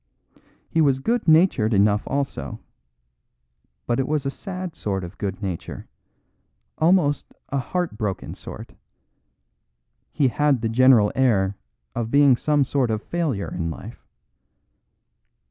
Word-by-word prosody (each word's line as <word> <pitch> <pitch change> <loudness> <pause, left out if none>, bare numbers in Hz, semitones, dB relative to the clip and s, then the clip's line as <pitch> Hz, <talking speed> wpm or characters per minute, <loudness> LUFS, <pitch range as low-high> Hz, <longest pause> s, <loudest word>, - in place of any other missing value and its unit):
He 165 - +1
was 140 -4 +3
good 230 - -1
natured 155 - +4
enough 105 +1 +3
also, 135 - -3 1.3
but 120 +1 0
it 130 - 0
was 150 -2 -1
a 135 - -1
sad 185 -1 -6
sort 95 - -3
of 90 +3 -9
good 100 +1 -4
nature, 90 -4 -5 0.9
almost 160 -4 +2
a 140 - -1
heart 175 - -3
broken 100 -3 -3
sort - - -10 1.4
he 135 -3 +2
had 145 -1 +1
the 115 - -1
general 115 -3 +5
air 100 -7 +2 0.4
of 115 -1 -3
being 140 0 +5
some 145 +3 +2
sort 130 -2 0
of 110 -1 -2
failure 155 -13 -2
in 85 -2 -2
life. 100 +8 -10
130 Hz, 130 wpm, -23 LUFS, 105-150 Hz, 1.4 s, general